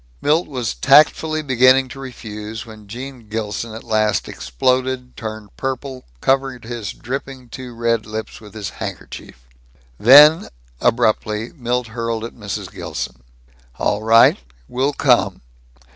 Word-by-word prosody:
Milt 160 - +2
was 125 -6 -3
tactfully 155 +2 +4
beginning 130 -1 +4
to 135 - -10
refuse 110 -4 -7
when 110 -2 -13
Gene 125 0 -9
Gilson 110 +1 -4
at 115 - -9
last 110 -1 0
exploded, 125 - -1
turned 110 -3 -8
purple, 130 0 -4 0.2
covered 135 -2 0
his 115 -3 -5
dripping, 130 0 -7
too 125 -1 -9
red 115 -1 0
lips 110 +1 -6
with 105 -1 -14
his 105 -4 -5
handkerchief. - - -8 0.5
Then, 150 +7 +8 0.3
abruptly, 110 -1 +1
Milt 125 -3 -2
hurled 115 0 -3
at 115 - -8
Mrs. 100 -4 -6
Gilson, 60 -1 -6 0.6
"All 105 - 0
right. 115 - +5 0.3
We'll 135 +4 -1
come. - - +2
120 Hz, 130 wpm, -20 LUFS, 110-130 Hz, 0.6 s, Then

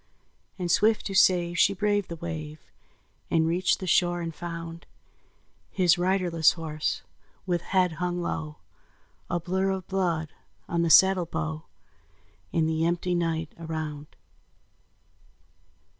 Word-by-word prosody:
And 175 -2 -2
swift 215 +4 +3
to 195 - -4
save 175 -3 +3
she 200 +1 +4
braved 205 0 0
the 170 - -5
wave, 155 -2 -6 0.7
And 160 -1 +2
reached 175 +3 +1
the 190 - -5
shore 175 0 +2
and 165 -1 -4
found 170 0 -7 0.8
His 175 -2 +3
riderless 175 -3 +3
horse, 155 -2 -3 0.4
with 175 -3 0
head 185 -1 +1
hung 180 0 -1
low, 155 -3 -4 0.7
A 175 - 0
blur 190 +3 -1
of 190 -2 -3
blood 170 -5 -1 0.4
on 170 0 0
the 170 - +1
saddle 190 0 +6
bow, 80 - -4 0.9
And 160 -1 +1
the 160 0 0
empty 175 +2 0
night 165 -2 -1
around. 155 -3 -5
170 Hz, 130 wpm, -27 LUFS, 160-185 Hz, 0.9 s, saddle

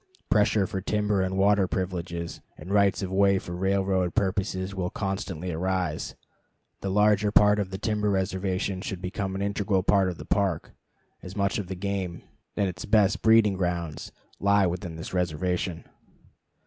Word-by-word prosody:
Pressure 105 -1 +3
for 95 +1 -4
timber 105 0 0
and 95 0 -1
water 100 0 +4
privileges, 85 -2 -4 0.2
and 95 - -9
rights 100 -1 +3
of 95 - -3
way 100 0 +4
for 85 -2 -5
railroad 95 -1 0
purposes, 95 -1 -1
will 90 -2 -2
constantly 95 -3 -3
arise. 90 -1 -2 0.6
The 100 - -3
larger 105 +1 +3
part 105 0 +5
of 100 -2 -1
the 95 - -5
timber 105 +1 0
reservation 95 0 -1
should 95 -1 -4
become 95 +1 -3
an 100 - -2
integral 100 -2 0
part 95 -1 +3
of 90 - -5
the - - -9
Park, 100 -3 0 0.5
as 90 - -9
much 100 -1 0
of 100 - -5
the 95 - -4
game, 95 -2 -3 0.3
and 100 -2 +2
its 90 -1 -5
best 100 -2 +3
breeding 110 -2 +5
grounds, 90 -4 -3 0.3
lie 100 0 +4
within 85 -1 -3
this 80 +3 -7
reservation. 90 0 -1
95 Hz, 160 wpm, -27 LUFS, 90-100 Hz, 0.6 s, part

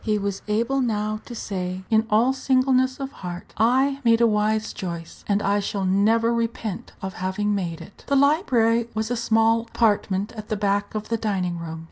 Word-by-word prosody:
He 215 -1 +1
was 200 -1 -3
able 235 +6 +1
now 215 -3 -1
to 240 - -8
say, 185 -3 -4
in 220 0 +3
all 230 +5 +3
singleness 260 0 +2
of 270 0 -4
heart, 180 -5 -8
"I 265 +5 +2
made 230 -1 +4
a 235 - +5
wise 215 0 +1
choice, 170 -3 -7
and 205 0 +1
I 200 +1 +2
shall 200 -1 -2
never 220 +5 +3
repent 230 -4 -3
of 190 0 -4
having 205 +3 0
made 175 -5 -3
it." 200 - -14
The 280 - +2
library 245 - +3
was 220 +2 -2
a - - +1
small 225 0 +3
apartment 210 -3 0
at 215 -2 -9
the 215 - -1
back 200 +1 0
of 215 0 -4
the 230 - +1
dining 185 -6 -2
room. 165 -1 -6
215 Hz, 190 wpm, -24 LUFS, 200-235 Hz, -, a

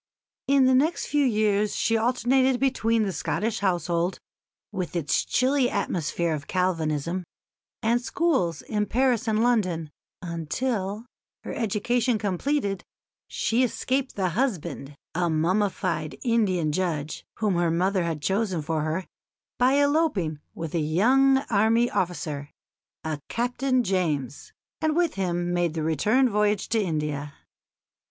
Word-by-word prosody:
In 275 -1 +5
the 260 - +4
next 300 +7 +2
few 295 0 +1
years 210 -4 +1
she 225 - +1
alternated 250 +2 +2
between 230 -4 +2
the 200 - -1
Scottish 210 +6 -2
household, 175 -2 0 0.5
with 185 -4 -4
its 165 -4 +1
chilly 260 0 +2
atmosphere 170 -3 -1
of 145 -2 -5
Calvinism, 170 -1 -1 0.6
and 235 +2 +2
schools 240 - 0
in 210 -2 -1
Paris 245 -1 +1
and 220 0 +2
London, 185 -10 +1 0.3
until, 195 - -3 0.4
her - - -5
education 230 +2 0
completed, 205 - -1 0.4
she 230 +3 0
escaped 260 +2 -1
the 190 -2 0
husband, 170 - -2 0.2
a 175 0 0
mummified 180 0 0
Indian 195 -10 +1
judge, 155 -3 -2
whom 210 -3 0
her 170 -1 +1
mother 185 +3 +1
had 160 -3 -3
chosen 190 -5 0
for 155 +1 -1
her, 160 +4 -2 0.5
by 255 +2 +4
eloping 285 - +1 0.2
with 165 -2 -5
a 170 - +1
young 250 - +4
army 225 +3 +3
officer, 150 -5 -2 0.5
a 155 -2 -3
Captain 250 +2 0
James, 155 - -2 0.3
and 315 -1 +1
with 345 -1 +2
him 175 -2 -1
made 175 -2 0
the 160 - -2
return 210 - +3
voyage 210 -2 +1
to 225 - +2
India. 150 -5 -3
195 Hz, 130 wpm, -26 LUFS, 170-240 Hz, 0.6 s, In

